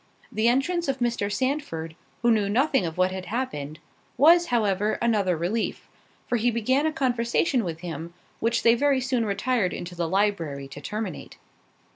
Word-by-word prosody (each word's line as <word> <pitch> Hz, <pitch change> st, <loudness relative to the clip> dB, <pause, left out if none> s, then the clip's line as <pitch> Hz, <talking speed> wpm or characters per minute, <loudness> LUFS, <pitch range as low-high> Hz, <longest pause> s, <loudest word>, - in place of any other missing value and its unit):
The 220 Hz, +2 st, +1 dB
entrance 315 Hz, +8 st, +1 dB
of 270 Hz, -1 st, 0 dB
Mr. 235 Hz, -5 st, -1 dB
Sandford, 205 Hz, -, -2 dB, 0.3 s
who 235 Hz, -, +5 dB
knew 210 Hz, -3 st, +2 dB
nothing 255 Hz, -, +2 dB
of 160 Hz, -, -7 dB
what 185 Hz, 0 st, +2 dB
had 185 Hz, -1 st, -6 dB
happened, 155 Hz, -, -3 dB, 0.4 s
was 340 Hz, +6 st, +6 dB
however, 210 Hz, -3 st, +1 dB
another 205 Hz, -7 st, +1 dB
relief; 190 Hz, +8 st, -2 dB, 0.4 s
for 245 Hz, -, 0 dB
he 235 Hz, +2 st, +2 dB
began 255 Hz, +6 st, +1 dB
a -, -, 0 dB
conversation 250 Hz, -1 st, +1 dB
with 165 Hz, -3 st, -5 dB
him, 170 Hz, 0 st, -6 dB, 0.2 s
which 230 Hz, +1 st, 0 dB
they 230 Hz, -, +6 dB
very 275 Hz, +2 st, +2 dB
soon 250 Hz, -2 st, 0 dB
retired 215 Hz, -1 st, 0 dB
into 175 Hz, +1 st, -6 dB
the 170 Hz, -1 st, -2 dB
library 170 Hz, -8 st, 0 dB
to 145 Hz, -, -9 dB
terminate. 210 Hz, +1 st, -5 dB
220 Hz, 165 wpm, -25 LUFS, 180-255 Hz, 0.4 s, was